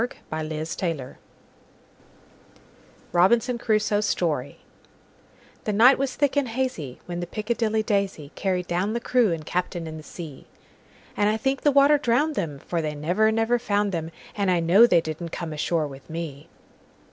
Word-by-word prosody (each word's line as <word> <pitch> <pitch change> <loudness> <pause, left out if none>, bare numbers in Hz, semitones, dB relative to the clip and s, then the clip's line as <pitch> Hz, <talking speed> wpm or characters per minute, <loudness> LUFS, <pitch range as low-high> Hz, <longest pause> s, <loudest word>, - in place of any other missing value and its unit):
Carryl1841–1920 155 -2 -3 2.0
Robinson 235 +8 +3
Crusoe's 215 -2 +1
Story 150 -6 -1 1.0
THE 210 - 0
NIGHT 245 +6 +6
was 275 -1 -1
thick 285 -1 +1
and 285 -2 +2
hazyWhen 180 - -4
the 175 - -4
"Piccadilly 220 0 -1
Daisy"Carried 190 -3 -1
down 180 +5 -1
the 235 - -1
crew 240 -4 +2
and 160 -2 -3
captain 175 0 -2
in 160 0 -6
the - - -8
sea; 155 -3 -10 0.7
And 205 0 +2
I 215 - +1
think 270 +4 -1
the 290 - +4
water 280 +1 +5
drowned 290 +4 +1
'em; 150 -4 -3
For 165 +4 -3
they 150 -1 -3
never, 180 +9 +2
never 225 +2 +1
found 205 -3 0
'em, 165 -1 -3 0.3
And 200 -2 0
I 180 -1 +3
know 185 +8 +6
they 175 -7 +4
didn't 160 +2 -5
come 165 -1 -5
ashore 155 +1 0
with 135 -1 -12
me. 160 -3 -6
185 Hz, 150 wpm, -25 LUFS, 160-225 Hz, 2.0 s, NIGHT